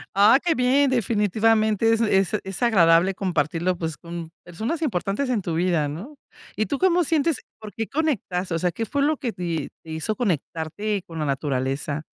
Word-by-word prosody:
¡Ah, 210 +6 +7
qué 340 -2 +2
bien! 265 +2 +3
Definitivamente 220 -1 +2
es 225 - +1
es 195 -5 +2
es 190 -1 -6
agradable 180 -4 +4
compartirlo, 175 0 -1
pues, 160 -2 -3
con 170 -1 -7 0.2
personas 220 - -4
importantes 225 - -1
en 235 -5 +1
tu 175 -3 -3
vida, 170 -3 +1
¿no? 195 - -7 0.4
¿Y 215 - +1
tú 285 - -2
cómo 360 +2 +3
sientes? 315 -1 +1 0.2
¿Por 215 -1 -8
qué 225 -1 -3
conectas? 210 - -1
O 165 - 0
sea, 180 +1 +1
¿qué 225 +7 -3
fue 280 +6 -1
lo 305 +1 +2
que 255 -4 -3
te 170 -5 -3
te 160 - -10
hizo 160 +7 -2
conectarte 195 - -2
con 165 -1 -7
la 155 - -1
naturaleza? 140 +1 -2
195 Hz, 185 wpm, -24 LUFS, 165-240 Hz, 0.4 s, Ah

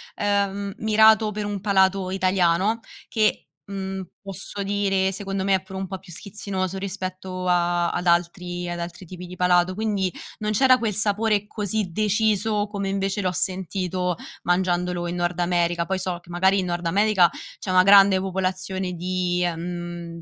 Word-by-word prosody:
ehm, 200 -1 0
mirato 220 0 +5
per 210 0 -4
un 205 -2 -4
palato 190 -2 +2
italiano, 185 +3 +2 0.3
che, 215 -2 +1 0.2
mhmm, 195 -1 -5 0.2
posso 195 +1 -3
dire, 195 -1 +1
secondo 195 0 -3
me 195 0 +3
è 190 - -1
pure 190 0 -9
un 190 - -3
po' 190 0 -6
più 190 -1 -15
schizzinoso 190 0 -4
rispetto 185 -1 -5
a 175 -1 +2
ad 175 - -3
altri 175 +1 0
ad 175 0 -4
altri 175 +2 -7
tipi 180 +1 -9
di 180 - -9
palato, 180 0 +3
quindi 200 -3 -1 0.3
non 215 0 -1
c'era 255 +3 +5
quel 215 -4 -1
sapore 210 0 +1
così 210 -3 -2
deciso 210 +1 +1
come 200 -1 -3
invece 195 +1 -1
l'ho 185 -1 0
sentito 185 -1 -1 0.3
mangiandolo 180 -1 0
in 175 - -3
Nord 175 0 -1
America. 175 -1 +1
Poi 190 0 -2
so 180 -2 -3
che, 175 - -22
magari, 190 +3 +3
in 185 - -1
Nord 175 -1 -2
America 195 -1 +4 0.3
c'è 190 - -6
una 185 0 +5
grande 195 -1 +7
popolazione 185 0 -2
di, 180 0 -1
mhmm 175 0 -6
190 Hz, 165 wpm, -24 LUFS, 180-200 Hz, 0.3 s, grande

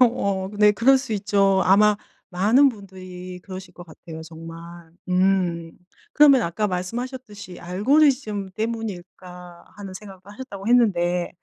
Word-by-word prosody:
어 200 -6 +1
네 210 0 +6
그럴 260 +6 +4
수 260 -4 -6
있죠. 200 -1 +2
아마 210 +2 +4 0.3
많은 220 +10 +4
분들이 185 -4 -9
그러실 190 -1 -10
것 175 - -11
같아요 160 0 -11
정말. 165 +1 -11 0.2
음. 180 -3 0 0.4
그러면 280 -5 +6
아까 170 +5 -1
말씀하셨듯이 205 +1 -6
'알고리즘 210 - +1
때문일까?' 185 -5 -7
하는 195 -2 -9
생각도 195 0 -12
하셨다고 205 -3 -9
했는데 180 -7 +2
195 Hz, 290 characters per minute, -22 LUFS, 180-220 Hz, 0.4 s, 네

